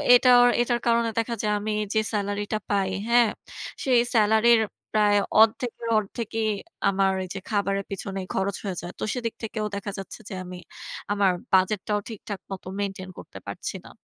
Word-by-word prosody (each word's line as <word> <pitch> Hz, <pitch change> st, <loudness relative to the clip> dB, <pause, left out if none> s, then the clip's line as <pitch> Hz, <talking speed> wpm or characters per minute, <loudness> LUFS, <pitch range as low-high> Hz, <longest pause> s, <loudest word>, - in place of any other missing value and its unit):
এটার 245 Hz, 0 st, +7 dB
এটার 240 Hz, 0 st, +1 dB
কারণে 235 Hz, 0 st, +3 dB
দেখা 235 Hz, +1 st, -1 dB
যায় 210 Hz, -1 st, +1 dB
আমি 215 Hz, +1 st, -2 dB, 0.2 s
যে 220 Hz, -, +3 dB
সেলারি 205 Hz, 0 st, -1 dB
টা -, -, +2 dB
পাই 195 Hz, -2 st, +2 dB, 0.2 s
হ্যাঁ? 235 Hz, -1 st, +5 dB, 0.5 s
সেই 255 Hz, -3 st, +4 dB, 0.2 s
সেলারির 220 Hz, +1 st, +5 dB, 0.3 s
প্রায় 210 Hz, -1 st, +4 dB, 0.2 s
অর্ধেকের 230 Hz, +1 st, +2 dB
অর্ধেকেই 220 Hz, +1 st, -2 dB, 0.4 s
আমার 195 Hz, 0 st, +2 dB
এই -, -, -6 dB
যে -, -, -3 dB
খাবারের 200 Hz, -1 st, +1 dB
পিছনেই 195 Hz, -1 st, -4 dB
খরচ 195 Hz, +1 st, 0 dB
হয়ে 190 Hz, -4 st, -3 dB
যায়। 175 Hz, +2 st, -7 dB
তো -, -, -3 dB
সেদিক 230 Hz, -3 st, -3 dB
থেকেও 215 Hz, -1 st, -3 dB
দেখা 200 Hz, 0 st, -4 dB
যাচ্ছে 195 Hz, -, -8 dB
যে -, -, -6 dB
আমি 180 Hz, 0 st, -8 dB, 0.6 s
আমার 200 Hz, -2 st, +3 dB, 0.2 s
বাজেট 190 Hz, +2 st, +4 dB
টাও 210 Hz, -1 st, +1 dB
ঠিকঠাক 210 Hz, -2 st, -6 dB
মত 190 Hz, -, -5 dB, 0.2 s
মেইনটেইন 195 Hz, -2 st, -4 dB
করতে -, -, -10 dB
পারছি -, -, -5 dB
না। -, -, -11 dB
210 Hz, 170 wpm, -25 LUFS, 195-230 Hz, 0.6 s, এটার